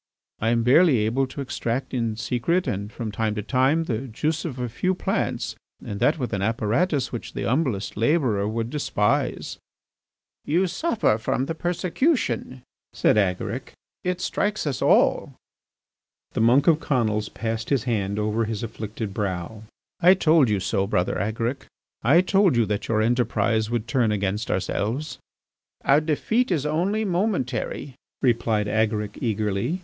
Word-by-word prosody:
I 110 - +1
am 115 0 +2
barely 140 +3 +5
able 130 +5 +1
to 130 +2 -7
extract 130 -1 -3
in 115 -3 -1
secret 125 +11 0
and 100 +2 -3
from 110 -2 -5
time 110 0 -1
to 105 - -3
time 135 +7 +2
the 130 -3 -3
juice 155 +8 -2
of 140 -6 -4
a 125 -1 -2
few 185 +11 -1
plants - - -2 0.3
and 100 - -5
that 150 +8 +3
with 125 -6 -3
an 100 - -1
apparatus 120 - 0
which 120 - -6
the - - -4
humblest 125 -7 -1
labourer 115 -4 +1
would 115 +2 -3
despise." 135 -1 -1 0.8
"You 175 +6 +2
suffer 195 - +1
from 125 +4 -1
the 165 - -3
persecution," 175 - -1 0.3
said - - +3
Agaric. 95 -4 -1 0.3
"It 180 0 -1
strikes 210 -2 -1
us 140 -4 -2
all." - - +3 1.0
The - - -1
monk 125 +5 +5
of 160 -2 +4
Conils 110 -8 0
passed 115 0 -3
his 135 -6 +1
hand 105 -5 -1
over 105 +2 0
his 110 -1 -4
afflicted 110 -2 -5
brow: 100 +2 -4 0.3
"I 180 +3 +7
told 155 -7 +4
you 105 -2 +1
so, 95 +1 0
Brother 90 -2 0
Agaric; 115 +6 -2 0.3
I 145 +10 +5
told 190 -3 +3
you 115 - +4
that 105 0 -3
your 110 -1 +2
enterprise 110 -2 +1
would 120 -1 -2
turn 120 -4 +2
against 100 +1 -1
ourselves." 115 +10 -2 0.7
"Our 140 +3 +5
defeat 220 - 0
is 155 -6 0
only 185 +8 0
momentary," 175 - -1 0.3
replied 115 -4 +2
Agaric 105 -1 -1
eagerly. 110 - -1
120 Hz, 155 wpm, -24 LUFS, 110-155 Hz, 1.0 s, I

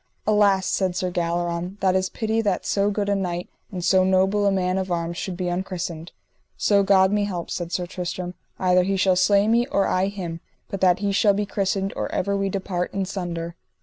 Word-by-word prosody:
Alas, 205 -3 +3
said 185 -2 0
Sir 185 0 -1
Galleron, 175 +2 -2
that 190 -1 +2
is 185 0 +1
pity 220 0 -1
that 200 -4 -1
so 200 0 +1
good 205 0 -1
a 205 - +2
knight 180 -3 -2 0.2
and 180 -3 -4
so 185 0 +4
noble 190 +2 +2
a - - +3
man 185 -1 0
of 190 -1 -4
arms 170 0 -2
should 180 0 -4
be 180 -1 -2
unchristened. 175 -2 -4 0.5
So 200 -1 +3
God 190 -1 +4
me 205 0 +1
help, 180 -4 -5
said 175 -1 -4
Sir 180 - -1
Tristram, 180 0 -5 0.2
either 180 -1 +3
he 195 +2 0
shall 185 0 +3
slay 200 +3 +4
me 235 +2 +3
or 200 -8 +1
I 185 +1 +1
him 180 -5 -5 0.3
but 195 - -5
that 185 0 +4
he 200 - +1
shall 200 0 +3
be 205 +1 0
christened 195 -1 -1
or - - -3
ever 200 0 0
we 195 0 0
depart 185 -2 -3
in 195 -1 0
sunder. 170 -3 -4
190 Hz, 215 wpm, -23 LUFS, 180-200 Hz, 0.5 s, so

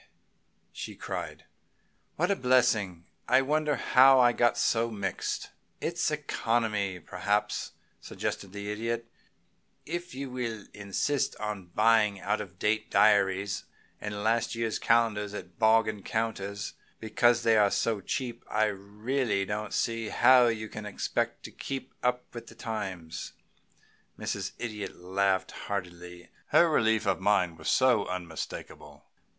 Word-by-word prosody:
she - - -7
cried, - - -6 0.7
"what 175 +5 +1
a - - +3
blessing! 110 - +2 0.2
I 130 +1 +5
wonder 150 +1 +1
how 130 +1 +6
I 120 -1 +6
got 120 -1 +2
so 115 0 +2
mixed!" 100 -4 -3 0.3
"It's - - 0
economy, 105 -5 -1
perhaps," 105 +4 -1 0.3
suggested 95 - -5
the 100 +1 -5
Idiot. 115 +2 -2 0.8
"If 175 -2 -5
you 135 -1 -5
will 115 -4 -4
insist 105 +7 -1
on 105 -4 -5
buying 105 +2 +3
out 105 +3 -1
of 95 -3 -10
date 110 +3 0
diaries 100 -1 +3 0.3
and 105 -1 -5
last 115 +1 +1
year's 115 -1 -1
calendars 105 -3 +2
at 90 -1 -9
bargain 110 -2 +3
counters 105 -2 -3 0.3
because 120 +2 +2
they 115 -1 +4
are 105 -2 +5 0.3
cheap, 120 0 -3
I 110 0 +2
don't 100 -2 -6 0.2
really 115 -7 +1 0.2
see 115 +1 -1
how 125 +1 +6
you 110 -2 -1
can 105 -1 -7
expect 100 - -2
to - - -8
keep 135 -1 -6
up 125 0 0
with 115 -1 -8
the - - -13
times." 95 -7 -5 0.8
Mrs. - - -3
Idiot 105 -5 -5
laughed 95 +1 0
heartily. 90 -3 -6 0.2
Her 170 - +5
relief 110 -6 +2
of 100 - +1
mind 90 -4 +2
was - - +2
unmistakable. 90 -10 -2
110 Hz, 130 wpm, -29 LUFS, 100-120 Hz, 0.8 s, how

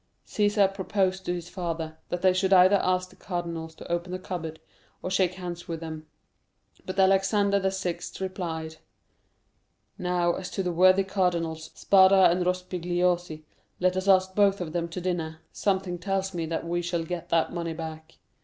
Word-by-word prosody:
"Cæsar 205 -2 +2
proposed 190 -1 -1
to 175 - 0
his 175 -1 -6
father, 165 -3 -4
that 175 +1 -3
they 185 -1 +5
should 185 +1 0
either 185 +2 +7
ask 185 0 0
the - - -18
cardinals 170 -3 -5
to - - -9
open 175 +1 -2
the 185 - -2
cupboard, 165 -4 -6 0.4
or 185 - -3
shake 185 -1 +2
hands 175 -2 -7
with 165 -1 -4
them; 160 -1 -7 0.8
but 185 +1 -3
Alexander 195 +1 +3
VI. 190 -3 -2 0.2
replied: 165 -4 -4 1.2
'Now 180 -1 +1
as 185 0 -5
to 195 - -3
the 180 - -1
worthy 185 +3 +5
cardinals, 170 -4 -1
Spada 190 -2 +6
and 180 +1 +1
Rospigliosi, 180 -2 -1 0.4
let 185 0 +2
us 185 +1 -2
ask 190 -1 +4
both 200 0 +3
of 165 -3 -5
them 170 -1 -1
to 170 - -5
dinner, 165 -3 -3
something 190 -3 -1
tells 195 +1 -2
me 165 -2 -3
that 165 +1 -3
we 175 +1 -1
shall 170 -1 -2
get 170 +1 -5
that 165 0 +1
money 170 -1 -3
back. 160 -1 -8
180 Hz, 170 wpm, -27 LUFS, 170-190 Hz, 1.2 s, either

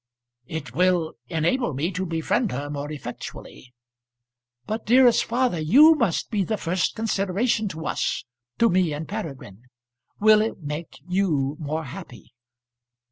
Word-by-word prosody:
"It 145 -7 -6
will 180 0 +2 0.2
enable 170 - 0
me 160 +7 -1
to 185 +1 -3
befriend 165 +7 0
her 145 +3 -4
more 145 +1 -4
effectually." 125 -2 -8 0.9
"But, 220 +1 -3
dearest 245 0 +6
father, 240 -7 0
you 270 - +7
must 205 - -1
be 205 -3 +1
the 215 +3 -2
first 180 -1 -1
consideration 215 +1 0
to 160 -4 -6
us, - - -1 0.3
to 230 - +4
me 180 -5 +2
and 150 +1 -5
Peregrine. 135 - -7 0.5
Will 215 0 +6
it 220 - -2
make 150 +3 -6
you 160 -7 0
more 155 +1 -3
happy?" 155 -3 -10
175 Hz, 135 wpm, -24 LUFS, 150-215 Hz, 0.9 s, you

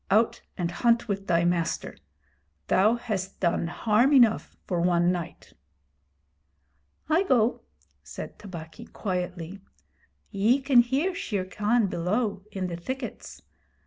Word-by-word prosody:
'Out 220 +4 +2 0.2
and 170 -2 -1
hunt 235 +5 +2
with 200 -2 -3
thy 170 -1 +2
master. 170 -1 -1 0.7
Thou 210 +5 +4
hast 205 -6 -4
done 170 -2 +1
harm 225 - +2
enough 240 -5 +4
for 175 -3 -1
one 175 0 +3
night.' 175 -3 -6 1.5
'I 320 +5 +3
go,' 245 -6 +2 0.4
said - - -9
Tabaqui, 185 +2 -9
quietly. 180 -1 -4 0.7
'Ye 220 +6 +3
can 265 -2 +4
hear 275 +10 0
Shere 205 - -3
Khan 210 +4 +1
below 195 +4 -1
in 190 -2 -3
the 175 -2 -4
thickets. 260 +10 -7
200 Hz, 120 wpm, -27 LUFS, 180-235 Hz, 1.5 s, Thou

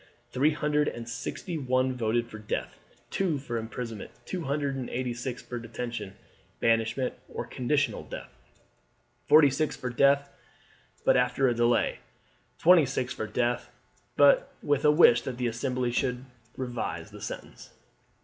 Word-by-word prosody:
Three 145 +4 +3
hundred 150 -1 +1
and 115 -1 -4
sixty 155 +8 -4
one 130 -1 +1
voted 120 -1 0
for 110 - -9
death, 110 - -4 0.3
two 180 -6 0
for 125 -4 -4
imprisonment, 115 -1 -6 0.2
two 180 -3 -4
hundred 140 0 -1
and 130 -2 -4
eighty 125 0 -2
six 125 +1 -5
for 120 - -5
detention, 115 -3 -6 0.4
banishment, 115 +3 +1 0.2
or - - -4
conditional 140 +3 0
death, - - -8 1.0
forty 150 -2 +7
six 150 +2 -1
for 125 - -4
death 140 +3 +4 0.8
but - - +5
after 125 +2 +2
a 120 - +3
delay, 120 0 +2 0.6
twenty 170 -4 +6
six 130 -1 -2
for 110 - -4
death 120 +2 -1 0.5
but - - +5
with 145 -1 +1
a - - +7
wish 150 -6 +6
that 130 -2 -5
the 125 - -1
Assembly 125 +1 -1
should 125 +1 -1 0.3
revise 125 -2 -4
the - - -11
sentence. - - -8
125 Hz, 150 wpm, -28 LUFS, 120-140 Hz, 1.0 s, forty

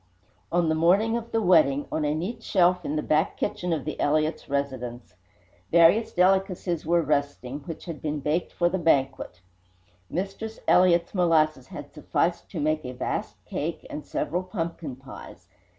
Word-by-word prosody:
On 175 -1 +2
the 160 - +2
morning 190 +8 +3
of 235 0 -4
the 225 -1 +1
wedding, 155 -6 +4
on 155 - -1
a 150 +1 +1
neat 210 +9 -4
shelf 180 -4 +2
in 150 - -2
the 150 - -1
back 155 +5 +1
kitchen 180 -3 -2
of 155 -5 -1
the 155 - -5
Elliott 155 +1 +1
residence, 130 -4 -3 0.6
various 170 +7 +5
delicacies 185 -3 +1
were 170 0 +3
resting, 145 -2 -1
which 165 - -7
had 165 -4 -7
been 150 -1 -2
baked 150 +5 -1
for 175 - +1
the 185 +2 -1
banquet. 135 - 0 0.7
Mistress 200 +5 -4
Elliott's 175 -2 +4
molasses 155 -7 +2
had 145 -1 -9
sufficed 165 +3 -1
to 175 - -5
make 155 +1 0
a 125 - -6
vast 125 - -4
cake - - -4
and - - -5
several 175 +4 -2
pumpkin 170 - -5
pies. 130 +1 -12
165 Hz, 165 wpm, -26 LUFS, 145-180 Hz, 0.7 s, various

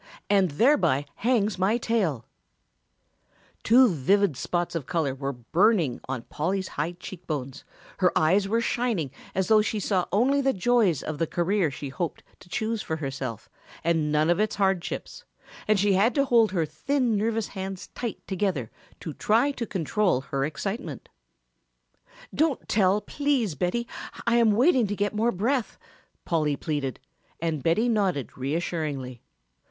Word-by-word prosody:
And 195 -3 +4
thereby 145 - +3
hangs 215 -4 +1
my 200 +5 +2
tale!" 190 - -1 1.4
Two 250 +3 +6
vivid 190 - +2
spots 175 +6 -2
of 165 -6 -4
color 160 -7 0
were 135 +1 -3
burning 155 - +1
on 130 -3 -3
Polly's 185 +8 -2
high 155 +4 -3
cheek 180 0 -10
bones, 140 -3 -4 0.4
her 180 -2 +4
eyes 190 +6 +3
were 230 +3 +1
shining 230 - -1 0.2
as 190 0 +1
though 215 -1 +6
she 215 0 -1
saw 190 -2 0
only 265 +7 +3
the 270 0 +2
joys 205 - +2
of 155 -2 -5
the 165 - +1
career 175 +1 +1
she 140 +1 -6
hoped 170 +4 -4 0.2
to 180 - -17
choose 220 +3 -2
for 160 - -3
herself 135 -6 -5 0.4
and 160 -3 +1
none 155 +2 +3
of 175 - +1
its 215 0 +1
hardships, 190 -3 -1 0.4
and 210 -1 +3
she 200 0 +3
had 205 +6 +3
to 280 -1 +3
hold 230 -5 +4
her 170 -4 +1
thin 255 - 0
nervous 225 +1 0
hands 190 -1 -6
tight 235 -3 -5
together 185 - -2 0.3
to 160 - -5
try 230 - +2
to 240 -4 -5
control 185 -4 0
her 135 0 -2
excitement. 195 - -4 1.2
"Don't 310 -4 0
tell, 200 0 +3
please, 265 - 0
Betty, 180 - -1 0.4
I 235 0 +3
am 230 -3 +4
waiting 250 0 +4
to 205 - -2
get 205 +1 -1
more 225 +3 +1
breath," 235 +6 -1 0.5
Polly 155 -4 +1
pleaded, 145 -3 -3 0.4
and 160 -3 -2
Betty 170 - +2
nodded 195 - 0
reassuringly. 140 -3 -3
190 Hz, 155 wpm, -26 LUFS, 155-220 Hz, 1.4 s, Two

